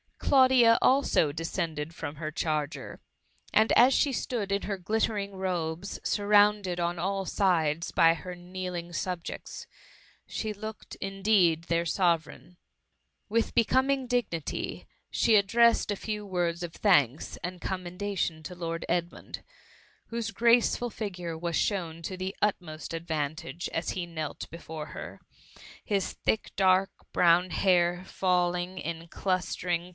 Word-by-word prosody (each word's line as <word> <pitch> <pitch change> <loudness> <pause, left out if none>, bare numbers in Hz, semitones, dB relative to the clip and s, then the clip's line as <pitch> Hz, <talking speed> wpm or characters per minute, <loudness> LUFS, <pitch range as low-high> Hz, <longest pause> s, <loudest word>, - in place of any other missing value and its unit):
Claudia, 255 -4 +5
also, 255 - +3
descended 165 -1 -3
from 155 -3 -6
her 155 0 -5
charger, 155 -1 -3 0.5
and 220 +1 +4
as 255 +3 +6
she 280 0 +2
stood 230 -4 -2
in 200 0 +1
her 200 -1 -2
glittering 200 +1 -1
robes, 180 -1 -3
surrounded 205 -3 +3
on 175 0 -1
all 195 +2 -1
sides 170 -5 +1
by 165 0 +5
her 180 +2 -7
kneeling 175 -1 -6
subjects, 175 0 -5 0.6
she 215 -1 -4
looked, 215 +1 -8
indeed, 195 -4 +2
their 170 0 0
Sovereign. 170 0 0 0.7
With 230 +1 +1
becoming 260 +3 +2
dignity, 235 - -2 0.2
she 225 - +3
addressed 230 +2 +4
a 205 - -2
few 210 0 -4
words 175 -2 -1
of 170 -2 -5
thanks 145 - +2
and 180 0 -4
commendation 180 -2 -3
to 180 +3 -7
Lord 165 -1 -4
Edmund; 175 0 -3 0.6
whose 230 -1 -3
graceful 235 +1 +3
figure 180 -7 -5
was 170 0 -2
shown 170 -5 -1
to 185 - -4
the 185 +1 -4
utmost 165 -7 -2
advantage, 160 +1 -3
as 165 - -1
he 180 -2 -3
knelt 160 -3 -5
before 160 -2 -7
her, - - -8 0.6
his 200 -3 -1
thick, 220 - -1
dark, 190 0 +4 0.2
brown 175 +1 +4
hair 175 -1 +2
falling 180 0 0
in 165 +1 -5
clustering 180 -2 -1
THE 175 - -12
MUMMT. - - -13
180 Hz, 130 wpm, -28 LUFS, 170-205 Hz, 0.7 s, as